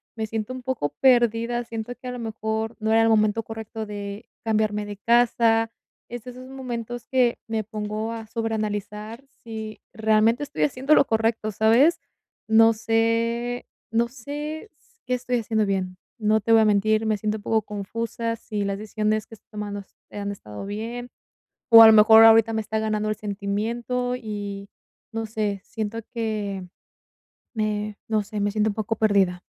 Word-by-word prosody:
me 220 Hz, -1 st, -2 dB
siento 220 Hz, +2 st, -4 dB
un 255 Hz, -1 st, -8 dB
poco 245 Hz, -, -1 dB
perdida, 240 Hz, -2 st, +3 dB
siento 230 Hz, +1 st, -5 dB
que 255 Hz, -, -7 dB
a -, -, -3 dB
lo 250 Hz, -, -6 dB
mejor 220 Hz, 0 st, -3 dB
no 220 Hz, 0 st, -1 dB
era 225 Hz, 0 st, +5 dB
el 225 Hz, -, +4 dB
momento 215 Hz, 0 st, +3 dB
correcto 220 Hz, 0 st, -6 dB
de 205 Hz, +1 st, -7 dB, 0.2 s
cambiarme 215 Hz, -1 st, 0 dB
de 205 Hz, -1 st, -7 dB
casa. 230 Hz, 0 st, +3 dB, 0.4 s
Es 240 Hz, -1 st, -7 dB
de 250 Hz, -, -8 dB
esos 255 Hz, +1 st, -11 dB
momentos 240 Hz, -3 st, -6 dB
que 250 Hz, -2 st, +3 dB
me 225 Hz, -1 st, -1 dB
pongo 215 Hz, +1 st, -4 dB
a 225 Hz, -1 st, -6 dB
sobreanalizar 215 Hz, +1 st, -4 dB, 0.2 s
si 220 Hz, -1 st, -7 dB
realmente 220 Hz, +3 st, +3 dB
estoy 290 Hz, 0 st, -2 dB
haciendo 275 Hz, +2 st, +3 dB
lo -, -, +5 dB
correcto, 225 Hz, -1 st, 0 dB
¿sabes? 230 Hz, -, +4 dB, 0.5 s
No 225 Hz, +1 st, +6 dB
sé, 230 Hz, +2 st, 0 dB, 0.2 s
no 230 Hz, +1 st, +2 dB
sé 295 Hz, -, -6 dB
s 460 Hz, -, -33 dB
qué 250 Hz, -, -1 dB
estoy 250 Hz, 0 st, -1 dB
haciendo 220 Hz, -1 st, 0 dB
bien. 185 Hz, -2 st, -2 dB, 0.2 s
No 215 Hz, 0 st, +2 dB
te 225 Hz, -, -1 dB
voy 225 Hz, -, +7 dB
a -, -, +4 dB
mentir, 215 Hz, +1 st, +2 dB
me 215 Hz, -1 st, +1 dB
siento 215 Hz, +1 st, -2 dB
un 205 Hz, -, -13 dB
poco 220 Hz, 0 st, +1 dB
confusa, 230 Hz, +3 st, -4 dB
si 210 Hz, -2 st, -4 dB
las 200 Hz, 0 st, -2 dB
decisiones 215 Hz, 0 st, -1 dB
que 225 Hz, -, -11 dB
estoy -, -, -29 dB
tomando, 205 Hz, -1 st, -5 dB
sí -, -, -36 dB, 0.2 s
han 200 Hz, 0 st, -3 dB
estado 105 Hz, -, -8 dB
bien, 230 Hz, +4 st, -5 dB, 0.6 s
o 225 Hz, -1 st, +11 dB
a -, -, +11 dB
lo -, -, +8 dB
mejor 220 Hz, +1 st, +8 dB
ahorita 225 Hz, 0 st, +6 dB
me 220 Hz, -, 0 dB
está 220 Hz, +1 st, -3 dB
ganando 215 Hz, -1 st, -1 dB
el 215 Hz, -, -1 dB
sentimiento 220 Hz, +5 st, -2 dB
y 205 Hz, -3 st, -6 dB, 0.4 s
no 225 Hz, 0 st, -3 dB
sé, 210 Hz, -2 st, -2 dB
siento 220 Hz, 0 st, -4 dB, 0.2 s
que, 210 Hz, -4 st, -3 dB, 0.9 s
me 210 Hz, -2 st, -2 dB
no 215 Hz, -2 st, +1 dB
sé, 210 Hz, +1 st, -6 dB
me 205 Hz, 0 st, +1 dB
siento 215 Hz, +1 st, +1 dB
un -, -, -2 dB
poco 220 Hz, 0 st, -2 dB
perdida. 200 Hz, -5 st, +2 dB
220 Hz, 175 wpm, -24 LUFS, 210-230 Hz, 0.9 s, o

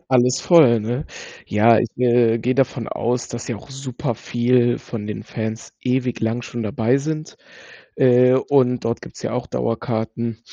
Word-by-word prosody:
Alles 125 Hz, 0 st, +3 dB
voll, 145 Hz, -10 st, +5 dB
ne? 120 Hz, +7 st, -3 dB, 0.4 s
Ja, 110 Hz, +2 st, +4 dB
ich, 120 Hz, -, 0 dB
äh, 120 Hz, -2 st, +3 dB
gehe 125 Hz, +3 st, 0 dB
davon 130 Hz, -3 st, 0 dB
aus, 120 Hz, +1 st, -2 dB
dass 120 Hz, -1 st, -7 dB
ja 120 Hz, -, -3 dB
auch 105 Hz, -, -14 dB
super 130 Hz, -3 st, -4 dB
viel 120 Hz, +1 st, +1 dB
von 105 Hz, -3 st, -7 dB
den 105 Hz, -3 st, -5 dB
Fans 110 Hz, 0 st, -5 dB
ewig 125 Hz, -1 st, -1 dB
lang 115 Hz, +2 st, -1 dB
schon 120 Hz, -1 st, -5 dB
dabei 110 Hz, +4 st, +1 dB
sind, 155 Hz, +2 st, -5 dB, 0.6 s
äh, 125 Hz, -1 st, +5 dB
und 130 Hz, -2 st, +2 dB
dort 115 Hz, +1 st, -2 dB
gibt's -, -, -11 dB
ja -, -, -3 dB
auch -, -, -3 dB
Dauerkarten. 110 Hz, -, -3 dB
120 Hz, 165 wpm, -21 LUFS, 115-125 Hz, 0.6 s, voll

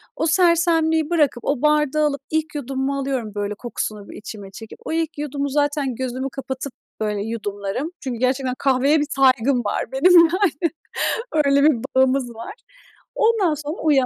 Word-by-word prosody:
O -, -, -1 dB
sersemliği 325 Hz, -2 st, +3 dB
bırakıp 295 Hz, -8 st, +1 dB
o 280 Hz, -3 st, 0 dB
bardağı 300 Hz, 0 st, +2 dB
alıp 280 Hz, -2 st, -3 dB
ilk 315 Hz, -1 st, -2 dB
yudumumu 270 Hz, 0 st, -2 dB
alıyorum, 265 Hz, -5 st, -2 dB
böyle, 205 Hz, 0 st, -2 dB
kokusunu 215 Hz, -2 st, -5 dB
bir -, -, -9 dB
içime 205 Hz, -2 st, -9 dB
çekip. 220 Hz, +3 st, -11 dB
O -, -, -4 dB
ilk 325 Hz, -1 st, -2 dB
yudumu 285 Hz, -1 st, -3 dB
zaten 290 Hz, -2 st, 0 dB
gözümü 260 Hz, +1 st, -3 dB
kapatıp, 265 Hz, 0 st, -5 dB, 0.3 s
böyle, 210 Hz, -2 st, -1 dB
yudumlarım. 210 Hz, -, -4 dB
Çünkü 250 Hz, -4 st, -5 dB
gerçekten 255 Hz, 0 st, 0 dB
kahveye 275 Hz, +3 st, +3 dB
bir 295 Hz, -, -1 dB
saygım 260 Hz, -2 st, +3 dB
var 205 Hz, -, -2 dB
benim, 275 Hz, +8 st, +4 dB
yani. 335 Hz, -2 st, +2 dB, 0.7 s
Öyle 280 Hz, 0 st, +4 dB
bir 300 Hz, -4 st, +5 dB, 0.2 s
bağımız 260 Hz, -2 st, +2 dB
var. 230 Hz, -, -7 dB, 0.6 s
Ondan 440 Hz, -7 st, +3 dB
sonra 300 Hz, +3 st, -5 dB
uyan 285 Hz, -5 st, +4 dB
275 Hz, 160 wpm, -21 LUFS, 250-305 Hz, 0.7 s, bir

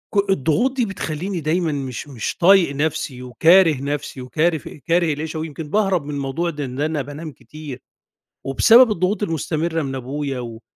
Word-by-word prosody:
ك 200 Hz, -1 st, +2 dB
الضغوط 195 Hz, -, +1 dB
دي 240 Hz, -, +2 dB
بتخلّيني 180 Hz, -1 st, -4 dB
دايمًا 160 Hz, +1 st, 0 dB
مش 135 Hz, -1 st, -5 dB
مش 120 Hz, -6 st, -4 dB
طايق 175 Hz, -5 st, +5 dB
نَفْسي 145 Hz, -4 st, -2 dB
وكاره 165 Hz, +6 st, +5 dB
نَفْسي 140 Hz, -2 st, -4 dB
وكارف 155 Hz, +4 st, 0 dB
كاره 165 Hz, +2 st, 0 dB
العيشة 155 Hz, +2 st, -5 dB
ويمكن 155 Hz, -1 st, -6 dB
باهرب 195 Hz, -5 st, +1 dB
من 150 Hz, -, -5 dB
الموضوع 140 Hz, +5 st, -2 dB
ده 150 Hz, -3 st, -4 dB
إن 130 Hz, +3 st, -5 dB
أنا 155 Hz, -1 st, 0 dB
بانام 145 Hz, +3 st, -7 dB
كتير، 150 Hz, -3 st, -10 dB, 0.6 s
وبسبب 230 Hz, -, +6 dB
الضغوط 195 Hz, +3 st, 0 dB
المستمرة 165 Hz, -1 st, -1 dB
من 135 Hz, -1 st, -4 dB
أبويا 135 Hz, +1 st, -4 dB
و 115 Hz, -1 st, -8 dB
155 Hz, 160 wpm, -21 LUFS, 140-175 Hz, 0.6 s, وبسبب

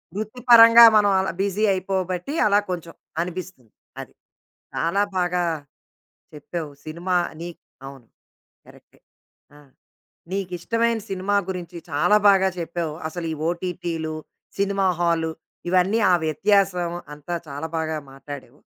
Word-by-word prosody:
వృత్తిపరంగా 230 Hz, +1 st, +7 dB
మనం 205 Hz, -1 st, +4 dB
అలా 190 Hz, -, -1 dB
బిజీ 200 Hz, +1 st, -1 dB
అయిపోబట్టి 185 Hz, -, -2 dB
అలా 205 Hz, 0 st, +4 dB
కొంచెం 170 Hz, -2 st, -5 dB, 0.3 s
అనిపిస్తుంది. 175 Hz, -, -7 dB, 0.3 s
అది. -, -, -12 dB, 0.6 s
చాలా 180 Hz, +5 st, +1 dB
బాగా 180 Hz, -1 st, +1 dB, 0.9 s
చెప్పావు. 155 Hz, +1 st, -6 dB
సినిమా 170 Hz, +4 st, -3 dB, 0.3 s
నీక్ 170 Hz, 0 st, -8 dB, 0.3 s
అవును. 135 Hz, -4 st, -12 dB, 0.6 s
కరెక్టే -, -, -20 dB, 0.6 s
ఆ! -, -, -15 dB, 0.7 s
నీకిష్టమైన 200 Hz, +5 st, -1 dB
సినిమా 195 Hz, +1 st, -1 dB
గురించి 180 Hz, -2 st, -6 dB
చాలా 150 Hz, +7 st, +3 dB
బాగా 195 Hz, -1 st, +5 dB
చెప్పావు. 170 Hz, -2 st, -3 dB
అసలు 170 Hz, +1 st, -6 dB
ఈ -, -, -5 dB
ఓటీటీలు, 170 Hz, -2 st, -4 dB, 0.4 s
సినిమా 195 Hz, -1 st, +1 dB
హాలు 165 Hz, -2 st, +1 dB, 0.4 s
ఇవన్నీ 185 Hz, +5 st, +3 dB
ఆ -, -, +5 dB
వ్యత్యాసం 180 Hz, +1 st, +1 dB, 0.2 s
అంతా 150 Hz, +4 st, -5 dB
చాలా 145 Hz, +3 st, -5 dB
బాగా 160 Hz, -1 st, -2 dB
మాటాడావు. 140 Hz, -1 st, -10 dB
180 Hz, 110 wpm, -23 LUFS, 165-195 Hz, 0.9 s, వృత్తిపరంగా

